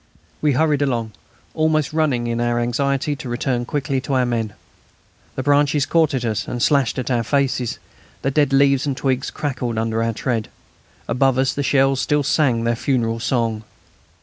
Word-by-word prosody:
We 150 -2 +3
hurried 150 +1 +2
along, 120 -5 -1 0.4
almost 155 -2 +1
running 145 -7 +1
in 120 0 -1
our 120 0 +1
anxiety 140 +4 0
to 135 -4 -7
return 120 0 -1
quickly 135 -1 -2
to 135 +1 -4
our 130 -1 +3
men. 115 -3 -2 0.8
The 130 - -3
branches 145 0 +3
caught 160 -3 +2
at 125 -2 -2
us 110 -2 -2
and 120 - -4
slashed 140 -1 +2
our 120 -2 +2
faces, 130 -1 0 0.5
the 135 - +1
dead 145 -1 +2
leaves 140 0 +3
and 135 -2 -2
twigs 135 0 -1
crackled 125 -5 -3
under 110 0 0
our 115 0 0
tread. 115 -1 -2 0.6
Above 130 +1 +2
us 130 0 +2
the 145 - -2
shells 135 -1 +2
still 150 -1 +1
sang 130 -5 +2
their 115 0 +1
funeral 115 -2 0
song. 115 -3 -1
130 Hz, 175 wpm, -20 LUFS, 120-140 Hz, 0.8 s, We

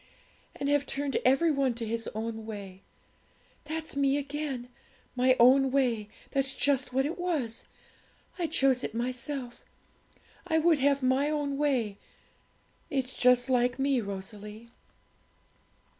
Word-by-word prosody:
"And 280 - -3
have 285 0 +2
turned 280 0 -2
every 275 +6 +4
one 275 -4 +1
to 230 -1 -4
his 230 0 -3
own 225 0 -4
way;" 200 -4 -8 0.8
that's 315 -1 -5
me 280 0 +2
again, 280 -3 -4 0.5
my 255 +1 +4
own 265 +3 +6
way, 245 -6 0 0.2
that's 270 -1 0
just 275 -2 +2
what 265 +2 +1
it 325 +5 -4
was; 300 -11 -2 0.7
I 340 - 0
chose 270 -5 +2
it - - -4
myself; 250 +1 -4 0.8
I 320 - +2
would 320 -1 +3
have 280 0 +2
my 260 +3 +2
own 290 -2 -1
way. 255 -8 0 0.9
It's 265 -4 -2
just 250 0 +4
like 250 -1 +2
me, 270 -2 +1
Rosalie.' 210 +3 -8
265 Hz, 130 wpm, -29 LUFS, 235-285 Hz, 0.9 s, own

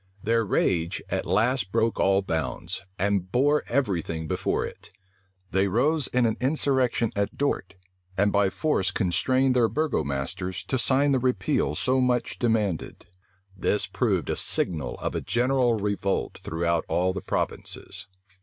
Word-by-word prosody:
Their 115 +1 +2
rage 85 -4 0
at - - -2
last 115 -3 +1
broke 115 0 +1
all 95 0 +3
bounds, 85 +4 -3
and 95 -1 0
bore 145 +5 +3
every 115 -9 +1
thing 80 0 -5
before - - -1
it. - - -10 0.6
They 95 +1 +2
rose 140 - +1
in 125 -1 +2
an 110 - 0
insurrection 130 -4 +1
at 100 0 -1
Dort, 140 -9 -1 0.4
and 100 +1 +3
by 100 -1 +3
force 125 - 0
constrained 130 +8 +1
their 120 -3 +4
burgomasters 90 - -2
to 130 - +1
sign 140 +3 +3
the 135 - +3
repeal 100 - 0
so 130 +9 +1
much 125 -2 0
demanded. 110 -7 -1 0.5
This 100 +2 +1
proved - - 0
a - - 0
signal 80 -4 -1
of - - -3
a - - -2
general 125 0 +2
revolt 100 -2 -1
throughout 85 0 0
all 90 +1 +1
the 95 - -4
provinces. 100 +1 -4
105 Hz, 145 wpm, -26 LUFS, 95-125 Hz, 0.6 s, their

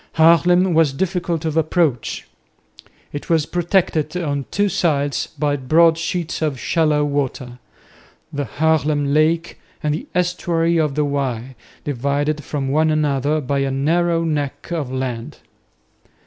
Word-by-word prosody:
Haarlem 170 +3 +4
was 160 -4 +3
difficult 175 0 -2
of 160 -1 -1
approach. 155 -5 0 0.9
It 145 - -6
was 160 -3 +3
protected 175 -3 0
on 145 -5 -2
two 205 0 +1
sides 145 -6 0
by 145 0 0
broad 160 +5 +4
sheets 170 0 -3
of 150 -5 -1
shallow 150 +3 +1
water, 135 -3 -3 0.7
the 145 0 -2
Haarlem 150 0 +1
lake 160 +3 +1 0.2
and 150 -1 +1
the 155 - -5
estuary 170 -2 +1
of 150 -3 0
the 150 -1 +1
Y, 135 -3 -2 0.3
divided 145 +3 -1
from 140 -3 -3
one 155 +3 +2
another 150 -1 +1
by 140 +1 -1
a 135 0 0
narrow 165 +5 +1
neck 145 -2 -3
of 150 -7 -2
land. 130 -3 -4
150 Hz, 135 wpm, -20 LUFS, 140-165 Hz, 0.9 s, Haarlem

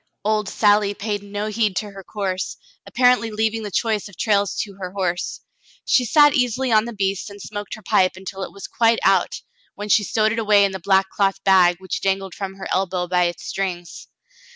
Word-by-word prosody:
Old 210 -2 0
Sally 205 -1 +2
paid 205 0 -3
no 205 +1 -5
heed 215 -2 0
to 210 +1 -3
her 195 -1 -11
course, 190 -2 -4 0.3
apparently 245 -2 +3
leav 220 0 0
ing 225 - -4
the 210 - -5
choice 215 +1 -1
of 200 - -15
trails 205 -3 +1
to 200 - -11
her 185 -1 -5
horse. 180 -3 -2 0.4
She 250 - +3
sat 295 +3 +5
easily 250 -2 0
on 215 0 +4
the 235 - -5
beast 195 0 -2
and 200 0 -12
smoked 205 0 -6
her 220 - -15
pipe 185 0 +2
until 190 +1 -8
it - - -5
was 200 - -9
quite 230 -1 +2
out, 190 -2 +2 0.3
when 205 +1 -6
she 210 - +4
stowed 215 +1 +1
it 225 - -2
away 210 -2 +4
in 195 - -1
the 190 - -6
black 190 +2 +2
cloth 195 -1 0
bag, 185 -2 +5
which 185 0 -5
dangled 195 -1 -1
from 195 -1 -6
her 195 - -7
elbow 185 -1 -1
by 180 0 +2
its 175 -1 -4
strings. 180 -3 -5
200 Hz, 210 wpm, -21 LUFS, 190-215 Hz, 0.4 s, sat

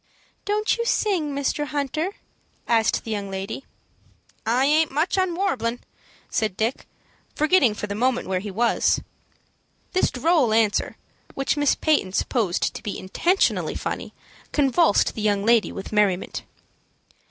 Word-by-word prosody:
"Don't 425 +3 0
you - - +1
sing, 380 -10 0
Mr. 285 +1 -1
Hunter?" 300 +6 -2 0.5
asked 225 -2 +2
the 225 - -6
young 200 -2 -3
lady. 195 +7 -5 0.8
"I 245 +4 +3
aint 310 +2 +3
much 305 +6 0
on 370 -3 +1
warblin'," 255 - -1 0.5
said 215 -4 -1
Dick, 225 +4 -1 0.5
forgetting 300 - +3
for 210 - -4
the 200 - -4
moment 245 +4 0
where 185 -1 0
he 205 +2 -6
was. 230 +5 +2 0.9
This 370 - +3
droll 280 -4 +2
answer, 220 -2 +1 0.4
which 275 +1 0
Miss 290 -1 +2
Peyton 295 - +1
supposed 205 -5 0
to - - -7
be 205 - -4
intentionally 345 - +1
funny, - - -4 0.4
convulsed 290 -2 +3
the 220 - -5
young 205 -1 +1
lady 230 -1 +4
with 195 - -7
merriment. 205 -3 0
250 Hz, 140 wpm, -24 LUFS, 210-310 Hz, 0.9 s, lady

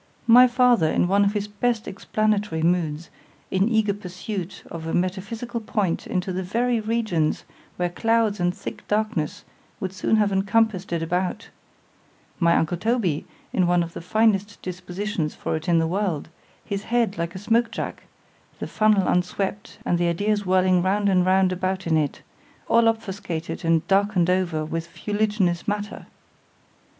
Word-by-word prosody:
——My 245 +2 +8
father 245 -7 +4
in 175 - +2
one 200 +2 +3
of 200 0 +2
his 205 -1 -2
best 220 +2 -1
explanatory 205 -4 -1
moods—in 170 +3 -1
eager 220 -3 +2
pursuit 185 -1 -6
of 165 -1 -6
a 165 - -1
metaphysical 210 +6 -2
point 205 -5 -1
into 185 +1 -2
the 185 - -2
very 235 +6 0
regions, 215 -8 0 0.3
where 180 - +1
clouds 225 +1 +1
and 175 0 +2
thick - - -8
darkness 210 -8 -1 0.4
would 190 -3 -4
soon 190 +3 +1
have 210 -2 +2
encompassed 195 -1 +1
it 170 -1 -1
about;—my 175 0 -3
uncle 165 +2 +1
Toby 195 -6 0 0.3
in 180 -2 +2
one 175 0 +3
of 170 0 -8
the - - -7
finest 205 +1 +1
dispositions 180 -2 -4
for - - -2
it 160 +2 -4
in 170 - +4
the 165 - +3
world;—his 185 +2 -4
head 230 -6 0
like 170 +1 -3
a - - -4
smoke 230 +4 +1
jack;——the - - -9
funnel 215 -3 +2
unswept, 195 +3 -1
and 175 - +1
the 175 - +2
ideas 205 +4 0
whirling 185 -1 +3
round 200 +2 +1
and 185 -1 +3
round 190 0 +4
about 185 +1 -2
in 165 -1 +2
it, 150 -2 -1 0.4
all 230 0 +4
obfuscated 190 -7 -3
and 165 -1 +2
darkened 195 -3 +3
over 175 -4 0
with 165 +1 -4
fuliginous 205 -2 -1
matter! 205 0 -3
190 Hz, 150 wpm, -24 LUFS, 175-215 Hz, 0.4 s, My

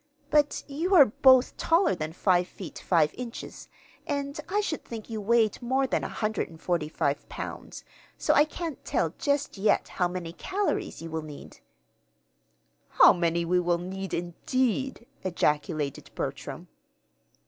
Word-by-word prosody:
But 295 -1 +2
you 305 +6 -2 0.3
both 260 -1 +7
are - - -35
taller 335 - +3
than 155 -3 -4
five 180 +1 +2
feet 185 -3 -9
five 155 -4 +2
inches, 240 -2 -8 0.4
and 280 0 -3
I 410 +2 +1
should 370 -7 -2
think 230 -1 -8
you 220 -1 -3
weighed 225 0 +2
more 260 +3 +1
than 260 - 0
145 165 -8 -2
pounds; - - -7 0.3
so - - +2
I 295 - +6
can't 320 0 -6
tell - - 0
just 285 -7 -1
yet 210 - +2
how 180 - 0
many 175 -2 -5
calories 390 - -2
you 165 - -7
will 160 0 -2
need." 150 -2 -11 1.3
"How - - +7
many 170 -1 0
we 180 +2 +2
will 175 -1 +1
need, 190 +2 -5
indeed!" 250 +9 -1 0.2
ejaculated 150 -4 -1
Bertram. - - -5
195 Hz, 135 wpm, -27 LUFS, 170-270 Hz, 1.3 s, both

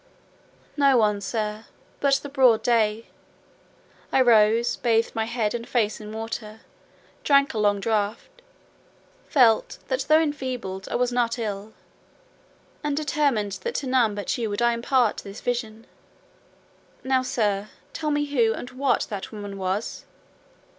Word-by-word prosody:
"No 275 -3 +4
one, 210 -3 +2
sir, 215 +1 -3 0.3
but 280 -1 +3
the 275 - -4
broad 260 -5 +4
day. 225 -2 +1 1.1
I - - +3
rose, 230 -1 +4
bathed 230 -1 +1
my 225 -1 -1
head 225 -2 -1
and 235 0 -5
face 220 -3 0
in 210 0 -8
water, 220 0 -6 0.6
drank 280 -1 +4
a 220 - -2
long 205 -1 +2
draught; 215 - -2 0.9
felt 235 -7 +3
that 260 0 -1
though 310 +1 +7
enfeebled 255 -11 -3
I - - -3
was 245 0 +1
not 240 -1 0
ill, 210 -1 -5 1.1
and 295 -1 -1
determined 285 -9 0
that 475 0 -4
to - - -2
none 245 -5 +2
but 205 - -2
you 225 -2 -1
would 205 - -3
I 235 0 +4
impart 240 -1 +1
this 200 +1 -8
vision. 230 -2 -3 1.2
Now, 260 0 +2
sir, 210 -5 -1 0.2
tell 310 -2 -2
me 295 0 +1
who 240 -6 +2
and 245 - -8
what 265 +1 +1
that 200 -2 -5
woman 205 -2 -7
was?" 195 +3 -3
230 Hz, 145 wpm, -24 LUFS, 210-260 Hz, 1.2 s, though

